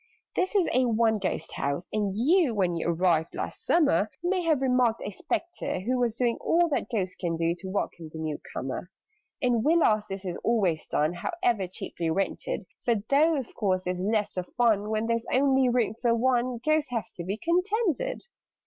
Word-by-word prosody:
"This 370 +3 0
is 380 -4 +4
a 255 +1 +3
'one 225 -2 +2
ghost' 185 -4 -3
house, 140 +5 -2
and 205 -3 0
you 290 - +3
When 180 -4 +1
you 165 - -2
arrived 165 -1 +1
last - - -5
summer, 250 - +3
May 365 +1 +1
have 315 -5 +1
remarked 250 -3 +2
a 205 - -3
Spectre 345 - -3
who 250 +6 0
Was 235 -3 +1
doing 240 -1 +1
all 345 +1 +3
that 290 - -1
Ghosts 190 -6 -2
can 170 -3 -2
do 165 +1 +1
To 190 - -7
welcome 175 -4 -3
the 160 - -8
new 155 -2 -3
comer. 135 +7 -4 0.5
"In 245 -3 +2
Villas 275 -9 +3
this 195 0 -6
is 180 -2 -4
always 190 -9 +1
done 155 +3 +1
However 220 - -1
cheaply 170 -2 -4
rented: 195 +3 -2 0.2
For, 235 - +2 0.2
though 310 +4 +5
of 265 -5 -4
course 185 -4 0
there's 180 0 -2
less 210 +1 0
of 180 -1 -2
fun 220 -4 +1
When 220 0 0
there 230 0 +2
is 230 - -9
only 265 -1 +3
room 240 -3 +1
for 235 -1 +3
one, 250 0 +1
Ghosts 310 -2 +2
have 235 -3 -3
to 170 - -7
be 195 +4 -3
contented. 400 - 0
225 Hz, 195 wpm, -27 LUFS, 185-265 Hz, 0.5 s, though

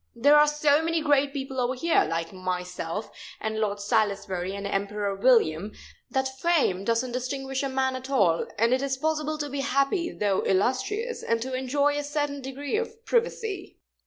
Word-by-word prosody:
There 285 +6 +5
are 300 0 +7
so 295 0 +3
many 330 0 0
great 285 -2 +2
people 270 -2 -4
over 250 +1 0
here, 330 +6 +2
like 165 +1 -3
myself 180 +1 -4 0.3
and 220 0 -3
Lord 205 -2 -1
Salisbury 200 -2 0
and 200 0 -5
Emperor 200 0 -1
William, 200 -4 +3 0.4
that 265 0 -2
fame 290 - +2
doesn't 230 +3 0
distinguish 265 +2 -3
a 275 - -1
man 265 0 0
at 260 +1 -7
all, 190 -12 +2
and 230 +3 +3
it 260 - +1
is 275 -1 -1
possible 310 +1 -1
to 295 -1 -3
be 285 0 -4
happy 275 +6 +1
though 200 -2 0
illustrious, 265 - 0
and 230 0 0
to 260 +1 -5
enjoy 285 +3 +1
a - - -3
certain 290 -1 -2
degree 275 +7 -3
of 460 0 -5
privacy." 445 -5 -1
265 Hz, 175 wpm, -26 LUFS, 210-290 Hz, 0.4 s, are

